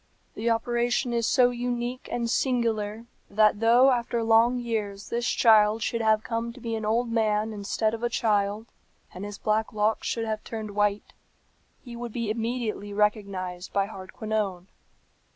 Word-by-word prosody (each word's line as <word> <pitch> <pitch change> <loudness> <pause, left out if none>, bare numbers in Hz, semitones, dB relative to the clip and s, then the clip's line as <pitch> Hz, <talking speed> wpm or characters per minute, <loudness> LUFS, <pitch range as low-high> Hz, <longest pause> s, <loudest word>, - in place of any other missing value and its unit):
"The 230 +2 -1
operation 240 +2 0
is 235 -1 +1
so 250 -2 +4
unique 245 +1 -3
and 235 -1 -1
singular 230 -3 0 0.2
that 210 0 +3
though 240 +4 +5
after 235 -1 -1
long 225 +2 +4
years 215 -4 -3
this 235 +1 -1
child 215 -1 +4
should 230 +2 -1
have 220 -1 +3
come 230 0 -3
to 255 - -13
be 230 -1 -4
an 220 - -4
old 230 +2 0
man 220 -1 +1
instead 215 +2 -1
of 230 - -5
a 240 - 0
child, 210 -1 0 0.5
and 185 - -7
his 205 0 -6
black 215 +1 0
locks 215 +1 0
should 230 -1 -1
have 215 -1 -3
turned 220 -2 -6
white, 205 0 0 0.7
he 240 -2 -9
would 235 -1 -6
be 230 -3 -2
immediately 225 -2 -3
recognized 200 -4 -1
by 200 -1 +2
Hardquanonne. 195 -1 -4
220 Hz, 160 wpm, -26 LUFS, 210-235 Hz, 0.7 s, though